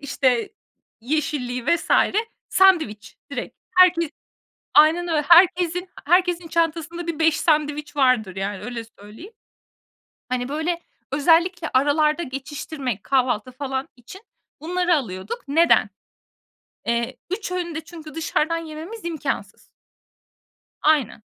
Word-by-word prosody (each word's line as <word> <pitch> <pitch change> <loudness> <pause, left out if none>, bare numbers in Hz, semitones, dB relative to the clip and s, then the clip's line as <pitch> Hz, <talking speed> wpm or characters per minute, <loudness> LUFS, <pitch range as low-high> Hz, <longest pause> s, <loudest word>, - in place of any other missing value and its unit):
işte, 280 - 0 0.5
yeşilliği 255 -2 -2
vs. 340 +2 +1 0.6
sandviç 315 - +2
direkt. - - -6 0.2
Herkes 345 -4 +5 0.7
Aynen 325 +4 +5
öyle. 315 -3 +1
Herkesin 355 +1 +5 0.2
herkesin 355 0 +2
çantasında 335 +1 -1
bir 330 -1 -3
5 320 -1 +3
sandviç 300 -2 0
vardır, 250 -9 +2
yani, 195 +1 -4
öyle 240 -2 -5
söyleyeyim. 225 - -14 1.0
Hani, 250 +1 -2
böyle, 330 +3 -2 0.3
özellikle 335 +4 +2
aralarda 300 +4 +2
geçiştirmek, 270 - -5
kahvaltı 255 -3 0
falan 265 0 -4
için 255 - -13 0.4
bunları 350 +2 +1
alıyorduk. 195 - -4
Neden? 320 -6 +4 1.0
Eee, 235 +2 -1
3 380 0 -4
öğünü 350 -3 -3
de 320 - -3
çünkü 315 -2 -12
dışarıdan 325 0 0
yememiz 330 +6 -8
imkânsız. 325 -3 -4 1.2
Aynen. 290 -8 +2
310 Hz, 105 wpm, -22 LUFS, 255-340 Hz, 1.2 s, Herkes